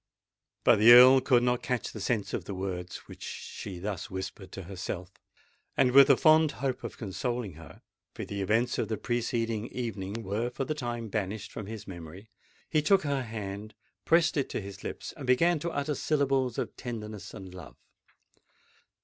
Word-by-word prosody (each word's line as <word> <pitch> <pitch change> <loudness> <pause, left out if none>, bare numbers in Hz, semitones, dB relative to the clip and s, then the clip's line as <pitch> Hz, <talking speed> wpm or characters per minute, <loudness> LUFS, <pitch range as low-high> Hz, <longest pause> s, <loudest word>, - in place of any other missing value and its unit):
But - - +5
the 115 +3 +9
Earl 130 +2 +9
could 125 -2 +3
not 125 0 +1
catch 125 -3 -2
the 110 - -8
sense 100 -1 -1
of - - -3
the 100 - -5
words 90 -1 -5
which - - -12
she 95 -3 -7
thus 100 0 -4
whispered 95 0 -6
to 95 - -6
herself; 90 0 -6 0.7
and, 125 - +4
with 135 +1 +8
the 140 -3 +6
fond 155 -1 +5
hope 135 -1 -3
of - - -6
consoling 110 +1 -3
her—for 80 +2 -12
the 100 0 -4
events 110 +5 +1
of - - 0
the 110 - -2
preceding 115 -2 -1
evening 115 -3 -4
were 105 +5 -1
for 135 +2 -4
the 155 - -1
time 120 -5 -4
banished 105 0 -3
from 100 - -7
his 110 -2 -7
memory—he 95 - -6
took 190 +6 +4
her 140 -2 0
hand, 110 -2 -6 0.3
pressed 165 -2 +3
it 140 - 0
to - - -2
his 100 -1 -9
lips, - - -6
and 140 -5 -8
began 165 +6 +4
to 170 - -2
utter 145 -1 -2
syllables 135 -5 +1
of - - -3
tenderness 110 -4 -6
and 95 -2 -9
love. 90 - -11
115 Hz, 175 wpm, -29 LUFS, 100-130 Hz, 0.7 s, the